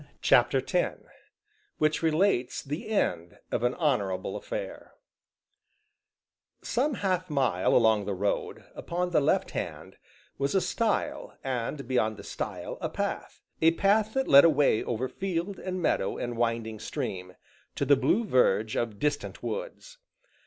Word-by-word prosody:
CHAPTER 125 +2 +4
X 180 -2 0 0.8
WHICH 155 0 +1
RELATES 160 -5 +1
THE 150 - -5
END 90 - -1
OF - - 0
AN 120 +1 +1
HONORABLE 100 - 0
AFFAIR - - -6 1.7
Some 270 +3 0
half 185 -3 -1
mile 130 -11 +1
along 110 -3 +4
the 100 - -2
road, 100 +2 -2
upon 180 +1 -3
the 155 - +3
left 140 - +1
hand, - - -6 0.4
was 140 +4 0
a - - +5
stile, 295 +10 -1
and 130 +1 -3
beyond 110 -4 +1
the - - -10
stile, - - -5
a - - -2
path - - -4 0.2
a 165 +1 +5
path 210 +5 +2
that 265 0 +1
led 140 0 +9
away 145 -8 +4
over 120 +2 -2
field, 185 +3 -3
and 185 0 -4
meadow, 95 - 0
and 120 0 -4
winding 115 -2 -1
stream, 90 -2 -5 0.4
to - - -1
the 145 - +6
blue 140 - +1
verge 110 - +2
of 115 -3 -2
distant 150 +6 -2
woods. - - -6
140 Hz, 140 wpm, -28 LUFS, 115-190 Hz, 1.7 s, led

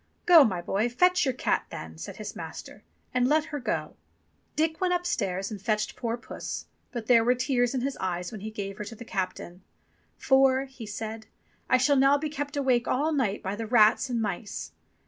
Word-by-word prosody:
"Go, 340 -4 +9
my 185 -8 -1
boy, 215 +7 0
fetch 360 +7 +3
your 265 - +1
cat - - 0
then," - - -8
said - - -7
his - - -6
master, - - -8 0.3
"and 250 0 +3
let 305 +2 +3
her 290 - -1
go." 165 - -3 0.6
Dick 320 +2 0
went 360 -1 +2
upstairs 205 - -2
and 205 -3 -6
fetched 215 0 -1
poor 235 -1 -2
puss, 250 - -6 0.3
but 235 -4 -5
there 230 -1 +5
were 245 +2 +3
tears 250 -1 +1
in 255 - 0
his 275 +2 -2
eyes 180 -1 -3
when 215 -4 -8
he 215 - -5
gave 200 -2 -6
her - - -3
to 225 - -8
the 235 - -10
captain. 185 -2 -4 0.6
"For," 265 0 +4
he 260 -4 -10
said, 220 +1 -6 0.4
"I 255 - +6
shall 275 +3 +3
now 275 +2 +5
be 305 +1 -3
kept 290 0 -4
awake 255 -4 +2
all 295 +5 +1
night 245 -9 0
by 190 +2 -2
the 225 +1 -5
rats 225 +2 +4
and 240 -2 -1
mice." 205 -1 -4
245 Hz, 205 wpm, -27 LUFS, 210-275 Hz, 0.6 s, Go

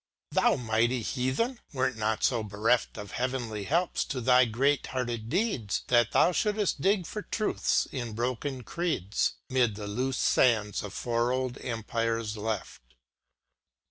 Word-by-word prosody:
Thou, - - +4
mighty 115 +1 +1
Heathen 135 - -1
I 140 - -16
wert 130 -1 +1
not 110 0 -1
so 120 -3 +2
bereft 110 +3 0
Of 105 -1 -7
heavenly 120 -5 -2
helps 170 - +1
to 135 - -3
thy 125 +1 +5
great 135 +6 +1
hearted 120 -4 -3
deeds 170 - 0
That 120 -2 +4
thou - - +4
shooldst 210 -4 0
dig 195 +1 +2
for 210 - -5
truths 215 +1 0
in 120 -4 -4
broken 125 +3 -2
creeds, 155 - -1
'Mid 125 -5 +2
the 105 0 -6
loose 125 +6 -2
sands 110 -5 +2
of 105 - -7
four 120 0 0
old 130 0 -2
empires 115 -1 -2
left. 110 - -4
120 Hz, 145 wpm, -29 LUFS, 110-135 Hz, -, thy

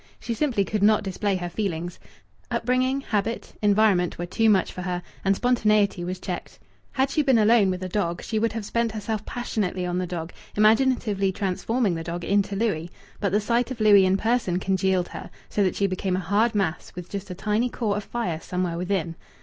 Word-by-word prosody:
She 235 - -3
simply 230 -5 +1
could 210 0 -2
not 210 +1 +4
display 195 +1 -1
her 180 -1 -3
feelings. 175 -2 -3 0.5
Upbringing, 255 +3 +1
habit, 220 -2 -2
environment 205 -4 +3
were 175 - -3
too 225 +5 +2
much 195 -3 +3
for 180 - -6
her, 180 -1 -3 0.2
and 195 0 +3
spontaneity 215 -6 +2
was 180 +1 -4
checked. 180 -2 -6 0.4
Had 265 +1 +1
she 305 - +2
been 265 -4 +4
alone 215 -2 +5
with 185 0 -3
a - - -2
dog 175 -3 -2
she 220 - -1
would 230 +1 +1
have 220 -2 -4
spent 230 0 0
herself 215 0 -3
passionately 205 -6 -2
on 180 0 -1
the 180 - -2
dog, 170 -1 -5 0.2
imaginatively 215 -3 +3
transforming 200 +3 0
the 165 -1 -4
dog 170 +1 -5
into 200 +1 +1
Louis; 195 -6 -1 0.3
but 200 - 0
the 205 - +3
sight 235 +4 0
of 260 -3 -6
Louis 205 -3 +6
in 190 +1 +3
person 225 -5 +1
congealed 190 -1 +1
her, - - -8 0.2
so 210 - 0
that 185 -3 +2
she 200 - +1
became 185 -1 -1
a - - 0
hard 210 +5 +1
mass 190 -6 -1
with 180 -1 -7
just 200 0 -6
a 180 - -5
tiny 215 +5 0
core 215 -4 -1
of 205 - -3
fire 185 -10 -3
somewhere 180 -1 -2
within. 180 -3 -1
200 Hz, 205 wpm, -25 LUFS, 180-220 Hz, 0.5 s, Louis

